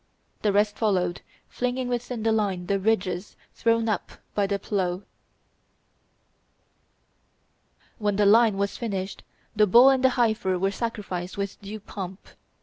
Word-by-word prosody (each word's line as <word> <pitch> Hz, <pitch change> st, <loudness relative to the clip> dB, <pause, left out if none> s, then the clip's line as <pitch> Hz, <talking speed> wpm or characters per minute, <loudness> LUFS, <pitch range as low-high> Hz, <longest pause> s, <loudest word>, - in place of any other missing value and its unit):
The 210 Hz, -, +2 dB
rest 205 Hz, +1 st, +2 dB
followed, 180 Hz, -5 st, 0 dB, 0.3 s
flinging 250 Hz, +1 st, -2 dB
within 245 Hz, -1 st, -3 dB
the 225 Hz, -, +2 dB
line 200 Hz, -5 st, 0 dB
the 195 Hz, +2 st, 0 dB
ridges 190 Hz, -3 st, -1 dB, 0.2 s
thrown 230 Hz, 0 st, +1 dB
up 215 Hz, -4 st, -2 dB, 0.2 s
by 205 Hz, -1 st, +1 dB
the 200 Hz, 0 st, 0 dB
plough. 190 Hz, -2 st, -2 dB, 3.0 s
When 205 Hz, -2 st, 0 dB
the 205 Hz, +1 st, +3 dB
line 220 Hz, 0 st, +5 dB
was 200 Hz, 0 st, -1 dB
finished, 195 Hz, -5 st, -4 dB, 0.3 s
the 210 Hz, 0 st, +4 dB
bull 245 Hz, +7 st, +8 dB
and 265 Hz, -1 st, +1 dB
the 260 Hz, -, +6 dB
heifer 220 Hz, -6 st, +1 dB
were 195 Hz, +2 st, 0 dB
sacrificed 200 Hz, -6 st, -4 dB
with 200 Hz, +1 st, -4 dB
due 205 Hz, +2 st, -7 dB
pomp. 195 Hz, -2 st, -8 dB
205 Hz, 140 wpm, -25 LUFS, 195-225 Hz, 3.0 s, bull